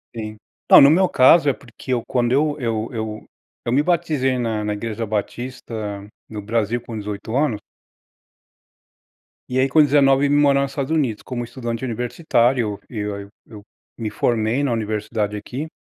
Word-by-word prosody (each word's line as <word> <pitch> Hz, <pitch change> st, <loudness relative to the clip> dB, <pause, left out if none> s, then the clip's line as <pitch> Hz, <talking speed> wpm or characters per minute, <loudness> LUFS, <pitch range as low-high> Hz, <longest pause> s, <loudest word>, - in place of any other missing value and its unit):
Sim. 110 Hz, -1 st, -6 dB, 0.3 s
Não, -, -, +10 dB
no 140 Hz, -, +8 dB
meu 185 Hz, +5 st, +4 dB
caso, 145 Hz, +1 st, +5 dB
é -, -, +2 dB
porque 125 Hz, 0 st, -7 dB
eu 120 Hz, -, -1 dB
quando 120 Hz, -1 st, 0 dB
eu 145 Hz, +2 st, +2 dB
eu 115 Hz, -2 st, -2 dB
eu 110 Hz, -2 st, -5 dB, 0.4 s
eu 120 Hz, -, -1 dB
me 140 Hz, +3 st, +3 dB
batizei 155 Hz, -7 st, +1 dB
na 110 Hz, -3 st, -1 dB
na 105 Hz, 0 st, -1 dB
Igreja 115 Hz, +1 st, -4 dB
Batista 110 Hz, -1 st, -5 dB, 0.3 s
no 105 Hz, -1 st, -6 dB
Brasil 115 Hz, +2 st, -1 dB
com 115 Hz, -2 st, -7 dB
18 105 Hz, +2 st, -5 dB
anos. 135 Hz, -7 st, +1 dB, 1.9 s
E 125 Hz, -, -2 dB
aí 130 Hz, -, +3 dB
com 155 Hz, +3 st, +5 dB
19 140 Hz, -1 st, +4 dB
eu -, -, -2 dB
vim 145 Hz, -, +3 dB
morar 140 Hz, -1 st, +4 dB
nos 140 Hz, 0 st, -2 dB
Estados 140 Hz, +1 st, -3 dB
Unidos, 135 Hz, -10 st, 0 dB
como 120 Hz, -2 st, -4 dB
estudante 120 Hz, 0 st, -5 dB
universitário. 120 Hz, -2 st, 0 dB
Eu 105 Hz, -3 st, -4 dB
eu 100 Hz, 0 st, -9 dB, 0.2 s
eu 105 Hz, -2 st, -12 dB, 0.3 s
me 110 Hz, -3 st, -4 dB
formei 115 Hz, +3 st, 0 dB
na 140 Hz, -, 0 dB
universidade 105 Hz, -1 st, -2 dB
aqui. 130 Hz, +9 st, -6 dB
120 Hz, 170 wpm, -21 LUFS, 110-135 Hz, 1.9 s, Não